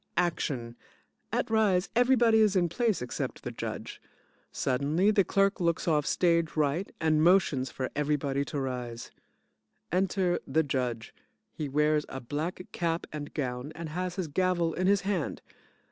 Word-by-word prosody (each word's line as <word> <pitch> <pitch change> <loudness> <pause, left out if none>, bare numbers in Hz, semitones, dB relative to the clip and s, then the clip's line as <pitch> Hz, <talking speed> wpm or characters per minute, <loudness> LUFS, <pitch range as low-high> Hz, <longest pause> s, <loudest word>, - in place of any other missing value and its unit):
ACTION: 135 -9 -1 0.6
At - - 0
rise 200 -4 +3
everybody 240 -2 +5
is 210 -2 +4
in 175 -2 +3
place 220 - 0
except 125 - -4
the - - -4
Judge. - - -6 0.5
Suddenly 150 +10 +1
the 205 -2 +4
CLERK 195 +1 +2
looks 170 -1 0
off 150 -3 +2
stage 170 -2 +2
right 155 +5 0
and 155 -1 +2
motions 165 -7 +3
for 130 - -4
everybody 145 -1 0
to 145 - -4
rise. 125 -3 -4 0.8
Enter 185 0 +1
the 160 - +2
JUDGE. 125 -5 -2 0.4
He 150 -2 -4
wears 150 +1 +2
a 135 - -5
black 155 +8 -4
cap 170 -1 -1
and 145 -1 -5
gown 125 0 -3
and 165 0 -6
has 180 +2 -3
his 185 -4 -2
gavel 175 +1 +1
in 185 +1 0
his 200 0 +4
hand. 190 -6 -2
165 Hz, 150 wpm, -29 LUFS, 140-185 Hz, 0.8 s, everybody